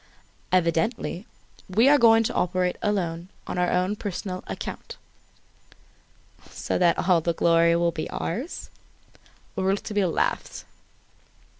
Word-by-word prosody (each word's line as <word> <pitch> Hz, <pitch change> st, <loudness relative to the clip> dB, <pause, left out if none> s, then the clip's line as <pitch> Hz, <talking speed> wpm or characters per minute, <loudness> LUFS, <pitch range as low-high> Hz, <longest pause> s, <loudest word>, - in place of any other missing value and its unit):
"Evidently. 180 Hz, +4 st, 0 dB, 0.4 s
We 220 Hz, +7 st, +4 dB
are 290 Hz, +1 st, +6 dB
going 225 Hz, -1 st, +6 dB
to -, -, -2 dB
operate 180 Hz, 0 st, 0 dB
alone, 180 Hz, -4 st, -2 dB, 0.2 s
on -, -, -4 dB
our 180 Hz, 0 st, +2 dB
own 185 Hz, +3 st, +1 dB
personal 190 Hz, -2 st, -5 dB
account." -, -, -7 dB, 1.5 s
"So -, -, -3 dB
that 175 Hz, 0 st, +2 dB
all 180 Hz, -3 st, +4 dB
the 170 Hz, +1 st, 0 dB
glory 170 Hz, 0 st, +3 dB
will 170 Hz, 0 st, +2 dB
be 155 Hz, -1 st, -5 dB
ours?" 245 Hz, -, -5 dB, 0.8 s
Rouletabille 195 Hz, 0 st, 0 dB
laughed. -, -, -2 dB
185 Hz, 115 wpm, -25 LUFS, 170-205 Hz, 1.5 s, are